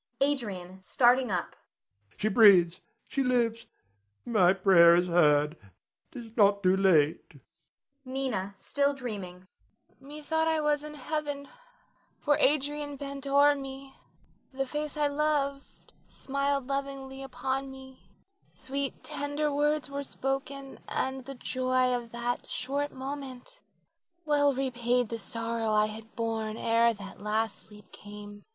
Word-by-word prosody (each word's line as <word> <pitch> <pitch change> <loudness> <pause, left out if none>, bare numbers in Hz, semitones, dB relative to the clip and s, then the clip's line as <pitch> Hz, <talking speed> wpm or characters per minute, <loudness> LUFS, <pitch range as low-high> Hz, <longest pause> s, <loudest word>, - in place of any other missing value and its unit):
Adrian 200 -10 -2
[starting 245 +5 +3
up]. 180 -3 -2 0.6
She 215 - 0
breathes, 190 -5 +6 0.3
she 275 - -1
lives, 235 -3 +1 0.6
my 200 -7 +4
prayer 185 -3 +6
is 175 +1 +3
heard. 150 -3 +3 0.6
'Tis 230 -3 -10
not 200 -2 +4
too 185 0 +4
late. 165 -6 +2 0.7
Nina 255 -7 -3
[still 285 0 0
dreaming]. 195 -8 -6 0.5
Methought 305 +3 -2
I 320 -1 +2
was 300 -1 +1
in 300 0 -8
heaven, 290 0 -4 0.7
for 290 -1 +2
Adrian 290 +1 +1
bent 280 0 -7
o'er 285 +1 +5
me; 270 -1 -8 0.6
the 270 0 -2
face 300 +2 -4
I 300 - +2
loved 285 -1 -2
smiled 275 0 -2
lovingly 275 0 -4
upon 265 +1 -3
me, 265 0 -12 0.5
sweet 275 0 -4
tender 290 +1 -2
words 295 +1 +1
were 280 0 -4
spoken, 270 0 -4
and 265 -1 -2
the 275 +1 -7
joy 255 0 0
of 240 -2 -4
that 240 +1 -3
short 285 +3 -2
moment 270 - -8 0.6
well 285 -2 +3
repaid 245 -2 0
the 230 - -4
sorrow 230 0 -3
I 210 0 +4
had 220 +1 -9
borne 225 -1 -2
ere 230 +1 +3
that 200 -3 -10
last 215 +1 -2
sleep 210 -1 -16
came. 205 0 -11
260 Hz, 125 wpm, -29 LUFS, 215-280 Hz, 0.7 s, breathes